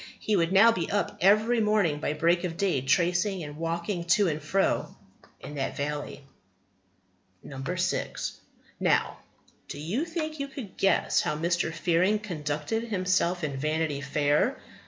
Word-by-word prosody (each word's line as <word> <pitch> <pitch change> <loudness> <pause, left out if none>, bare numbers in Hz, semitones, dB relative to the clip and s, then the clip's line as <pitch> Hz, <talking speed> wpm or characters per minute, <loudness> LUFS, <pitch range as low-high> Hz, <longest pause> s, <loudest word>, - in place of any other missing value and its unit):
He 215 - 0
would 170 -2 +1
now 200 +4 +7
be 180 -7 -2
up 205 0 -1
every 215 +5 +4
morning 210 -8 +2
by 150 - -1
break 170 +3 +2
of 170 -2 -3
day, 185 -9 +1
tracing 175 +6 +1
and 145 0 -8
walking 170 +2 -3
to 180 +2 +3
and 155 0 -3
fro 190 +6 0 0.4
in - - -9
that 135 -2 -3
valley." 145 0 -4 1.3
6. 135 -1 -3 0.4
Now, - - +1 0.5
do - - -7
you 200 - -2
think 315 -2 -4
you 280 - -2
could 260 -8 -9
guess 195 - +2
how 150 - -1
Mr. 170 0 0
Fearing 180 +5 +2
conducted 165 +2 -3
himself 185 -4 0
in 140 -3 -2
Vanity 155 0 -1
Fair? 145 - +1
175 Hz, 145 wpm, -27 LUFS, 150-205 Hz, 1.3 s, now